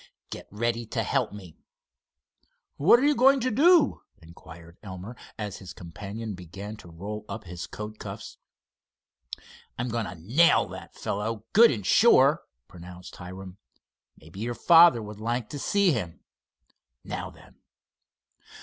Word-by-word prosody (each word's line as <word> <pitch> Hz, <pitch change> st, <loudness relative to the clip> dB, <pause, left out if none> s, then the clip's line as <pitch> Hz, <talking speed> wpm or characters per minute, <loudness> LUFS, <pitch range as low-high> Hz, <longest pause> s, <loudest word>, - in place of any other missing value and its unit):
"Get -, -, -8 dB
ready 115 Hz, +2 st, -2 dB
to -, -, -2 dB
help -, -, 0 dB
me." 95 Hz, -6 st, -12 dB, 1.2 s
"What 170 Hz, +11 st, +6 dB
are 270 Hz, -, +1 dB
you 295 Hz, -, +4 dB
going 270 Hz, +2 st, +5 dB
to 255 Hz, -, 0 dB
do?" 310 Hz, +5 st, +4 dB, 0.2 s
inquired 85 Hz, +1 st, -15 dB
Elmer, 95 Hz, +4 st, -9 dB, 0.2 s
as 105 Hz, -3 st, -5 dB
his 95 Hz, -, -10 dB
companion 100 Hz, +5 st, -7 dB
began 95 Hz, +4 st, -9 dB
to -, -, -14 dB
roll 100 Hz, +6 st, -7 dB
up 110 Hz, -, -6 dB
his 90 Hz, -2 st, -8 dB
coat 105 Hz, 0 st, -8 dB
cuffs. -, -, -8 dB, 1.4 s
"I'm 125 Hz, +1 st, -3 dB
going 115 Hz, -2 st, -2 dB
to 90 Hz, -, -8 dB
nail 120 Hz, -, +3 dB
that -, -, -10 dB
fellow, 105 Hz, +2 st, -4 dB
good 230 Hz, +2 st, +8 dB
and 105 Hz, -6 st, -3 dB
sure," -, -, +5 dB, 0.3 s
pronounced 90 Hz, 0 st, -12 dB
Hiram. 95 Hz, +1 st, -10 dB, 0.6 s
"Maybe 80 Hz, +5 st, -14 dB
your 120 Hz, +2 st, -3 dB
father 165 Hz, -8 st, +6 dB
would 105 Hz, 0 st, -9 dB
like 120 Hz, 0 st, -2 dB
to 145 Hz, -, -6 dB
see 200 Hz, +4 st, +2 dB
him. 90 Hz, -, -4 dB, 0.8 s
Now -, -, -5 dB
then!" -, -, -19 dB
105 Hz, 140 wpm, -26 LUFS, 90-125 Hz, 1.4 s, good